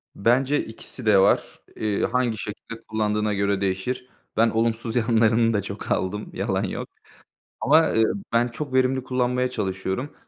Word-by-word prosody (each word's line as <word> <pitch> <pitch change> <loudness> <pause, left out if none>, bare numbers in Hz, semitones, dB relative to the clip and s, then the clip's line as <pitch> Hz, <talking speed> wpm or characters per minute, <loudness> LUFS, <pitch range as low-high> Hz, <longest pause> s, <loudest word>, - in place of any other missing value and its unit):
Bence 130 +7 +2
ikisi 115 +2 -10
de 105 -2 +5
var. 95 - +2 0.2
Eee, 105 -2 -1
hangi 120 -2 0
şekilde 110 +2 -7
kullandığına 105 -1 0
göre 100 0 0
değişir. 110 +7 -2 0.3
Ben 115 +1 +5
olumsuz 115 +1 -1
yanlarını 115 -1 +3
da 105 - +1
çok 100 +1 -7
aldım, 105 +3 -1
yalan - - -1
yok. - - -4 0.7
Ama, 155 +4 +5
eee, 110 - +4 0.3
ben 120 +1 +3
çok 130 +3 -6
verimli 130 0 +2
kullanmaya 125 0 0
çalışıyorum 95 +3 -3
115 Hz, 145 wpm, -24 LUFS, 105-125 Hz, 0.7 s, de